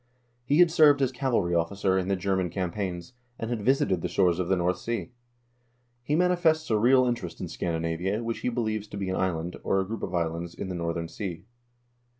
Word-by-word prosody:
He 145 +4 +2
had 175 -1 +6
served 150 -4 +6
as 130 - +1
cavalry 120 -9 0
officer 95 +3 +1
in 95 -1 0
the 100 - +1
German 95 -1 0
cam 90 -1 -2
paigns, 90 -1 -4 0.2
and 115 +1 -4
had 115 -3 -2
visited 130 - +2
the 90 - -1
shores 90 0 +2
of 90 - -1
the 95 - +4
North 90 0 0
Sea. 120 +2 -3 0.9
He 145 +5 -1
manifests 170 -4 +2
a 110 - +3
real 130 +3 +5
interest 105 -9 -3
in - - -4
Scandinavia, 85 +6 -2
which 115 0 -3
he - - -1
believes 110 -3 -2
to 100 - -8
be 95 -1 -2
an - - -1
island, 90 -2 -2
or 95 - +1
a 95 - 0
group 110 +2 -5
of 90 - -3
islands, 85 0 -2
in 95 - -5
the - - -3
northern 85 -1 -2
sea. 90 -1 -6
95 Hz, 210 wpm, -27 LUFS, 90-120 Hz, 0.9 s, had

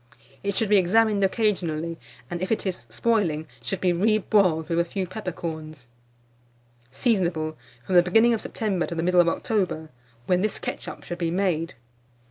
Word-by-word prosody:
It 200 -1 -2
should 220 - +1
be 210 - +6
examined 205 +2 +3
occasionally, 170 -6 0 0.3
and 175 0 -5
if 185 - -2
it 225 - 0
is 175 -11 -4
spoiling, 160 - 0 0.2
should 120 - -3
be 180 -1 +2
reboiled 190 -4 +2
with 170 0 0
a - - +4
few 185 +2 -3
peppercorns. 160 - -6 1.0
Seasonable 160 - 0 0.3
from 190 - -3
the 175 - +8
beginning 225 +7 +4
of 225 - -1
September 195 -6 -2
to 170 - -5
the 165 - -1
middle 180 0 +5
of 170 - +3
October, 180 -6 -1 0.3
when 180 +3 +2
this 215 0 0
ketchup - - -6
should 175 - -6
be 170 -2 0
made. 170 -2 0
180 Hz, 165 wpm, -25 LUFS, 165-205 Hz, 1.0 s, the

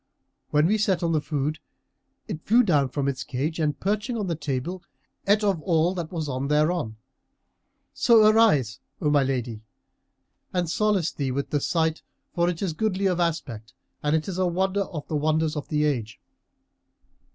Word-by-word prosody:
When 150 +1 +3
we 215 +5 +2
set 190 -4 +1
on 165 - +1
the 155 -2 +1
food, 150 +1 -2 0.7
it 175 -8 -5
flew 235 +7 +4
down 145 - +2
from 140 +1 -2
its 135 -2 -2
cage 145 +6 -3
and 150 -2 0
perching 210 +5 -1
on 210 - -2
the 170 -3 -1
table, 150 +4 -3 0.5
ate 205 +2 +4
of 195 -6 +1
all 170 +1 +2
that 170 -4 -5
was 165 -3 -3
thereon. 145 -1 0 1.0
So 225 -3 +5
arise, 200 - +3 0.2
O 150 -4 +1
my 145 -1 +4
lady, 125 -5 -2 0.9
and 180 -2 0
solace 200 -1 +1
thee 140 -2 -3
with 140 +2 -3
the 145 - +1
sight 160 0 0 0.3
for 175 0 +2
it 175 +1 -3
is 180 -5 -1
goodly 195 +2 -1
of 180 -2 +1
aspect 130 -10 -2 0.3
and 150 +1 +1
is 185 -2 -4
a 185 - +2
wonder 190 +3 0
of 155 -5 -7
the 155 - -3
wonders 155 +1 +1
of 150 - -4
the 150 -1 +1
age." 115 -7 -2
160 Hz, 175 wpm, -25 LUFS, 145-185 Hz, 1.0 s, So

